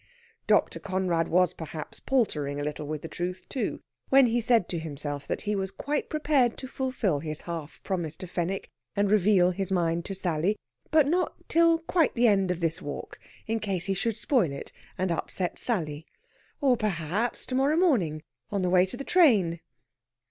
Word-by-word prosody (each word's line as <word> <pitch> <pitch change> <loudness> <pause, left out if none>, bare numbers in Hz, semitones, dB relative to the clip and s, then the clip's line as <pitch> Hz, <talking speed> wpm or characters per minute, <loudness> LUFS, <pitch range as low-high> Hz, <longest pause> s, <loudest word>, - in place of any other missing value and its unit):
Dr. - - +3
Conrad 185 -3 0
was 180 0 +3
perhaps 160 -2 -7
paltering 150 - 0
a - - -2
little 150 0 -4
with 150 0 -4
the - - -4
truth, 180 +2 -4
too, 260 - -3 0.3
when 270 0 +7
he 240 0 +1
said 230 -5 +3
to 170 - -2
himself 145 -2 -5
that - - -2
he 210 0 -1
was 190 -1 -1
quite 290 +9 -3
prepared 290 -6 +2
to 260 - -6
fulfil 255 - -1
his 155 0 -5
half 165 -3 -6
promise 175 -5 -2
to 185 - -7
Fenwick 180 +2 -3 0.2
and 200 -1 +2
reveal 195 -3 +4
his 195 +1 -3
mind 170 -2 +1
to 195 - -3
Sally; 180 +2 0 0.3
but 310 -2 +5
not 355 +4 +1
till 335 0 +4
quite 330 -1 +1
the 240 0 +4
end 195 -3 +3
of 180 -1 -2
this 165 -1 -1
walk, 145 - -7 0.3
in 225 +1 -1
case 195 -5 -1
he 195 - +1
should 225 +3 -1
spoil 220 - +2
it, 140 - -7 0.3
and 185 -1 0
upset 175 +2 -2
Sally. 160 -9 -2 0.5
Or, 265 -3 +4
perhaps, 205 +1 -1
to - - -5
morrow 275 +4 +3
morning, 190 - +2 0.3
on 200 -2 -1
the 180 - +1
way 185 0 +5
to 215 - -6
the 275 - -5
train. 215 - +4
190 Hz, 185 wpm, -27 LUFS, 165-240 Hz, 0.5 s, when